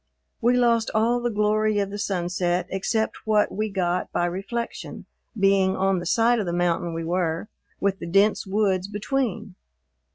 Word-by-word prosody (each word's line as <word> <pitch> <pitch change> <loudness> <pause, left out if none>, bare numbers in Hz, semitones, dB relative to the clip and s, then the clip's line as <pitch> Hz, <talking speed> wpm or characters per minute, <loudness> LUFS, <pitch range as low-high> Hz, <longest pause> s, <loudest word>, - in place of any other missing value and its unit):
We 245 +2 +3
lost 235 -2 +3
all 230 +3 +2
the 240 - 0
glory 215 0 +1
of 200 -1 -1
the 205 - -5
sunset 180 -2 -1
except 220 +3 -1
what 210 -1 +3
we 215 +1 -2
got 180 -2 -1
by 175 - 0
reflection, 195 +7 -5 0.3
being 195 -1 +3
on 190 -1 +1
the 175 - -5
side 235 +1 +3
of 205 - -2
the 170 - -1
mountain 175 -1 0
we 165 - -3
were, 170 +2 -1 0.3
with 195 -1 0
the - - -6
dense 200 +4 +2
woods 190 -2 +1
between. 215 -1 -2
195 Hz, 165 wpm, -24 LUFS, 180-215 Hz, 0.3 s, We